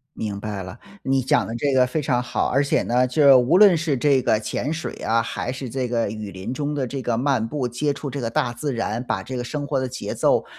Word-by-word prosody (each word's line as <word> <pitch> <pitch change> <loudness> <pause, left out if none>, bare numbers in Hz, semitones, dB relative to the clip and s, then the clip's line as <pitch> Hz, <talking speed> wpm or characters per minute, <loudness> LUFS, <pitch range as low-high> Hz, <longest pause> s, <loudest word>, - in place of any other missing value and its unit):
明 105 -2 -4
白 105 -2 -4
了， 95 +4 -9 0.3
你 135 0 +1
讲 130 - +2
得 115 - -5
这 140 +4 0
个 130 -1 +4
非 150 +5 -2
常 130 -3 +1
好。 - - -1
而 135 +2 +2
且 140 - +1
呢， 125 +1 +2
就 135 +1 +6
无 125 +8 +3
论 195 -3 +7
是 155 -3 0
这 135 +1 +3
个 110 -3 +1
潜 115 +6 -3
水 160 0 -4
啊， 115 +1 0
还 120 +2 -4
是 130 -1 -6
这 130 +1 -2
个 115 -3 0
雨 105 -2 -6
林 95 +5 -6
中 145 +2 -2
的 140 -3 -1
这 135 +2 -5
个 120 -2 -1
漫 125 -2 +1
步、 130 0 -2
接 145 +5 -1
触 140 - -6
这 140 - -4
个 115 - -2
大 120 +1 0
自 140 +3 -3
然， 115 0 -2
把 95 - -1
这 130 +6 -6
个 120 - -3
生 145 +3 -4
活 140 -1 -1
的 130 0 -1
节 130 - -5
奏 - - +2
125 Hz, 285 characters per minute, -23 LUFS, 115-140 Hz, 0.3 s, 论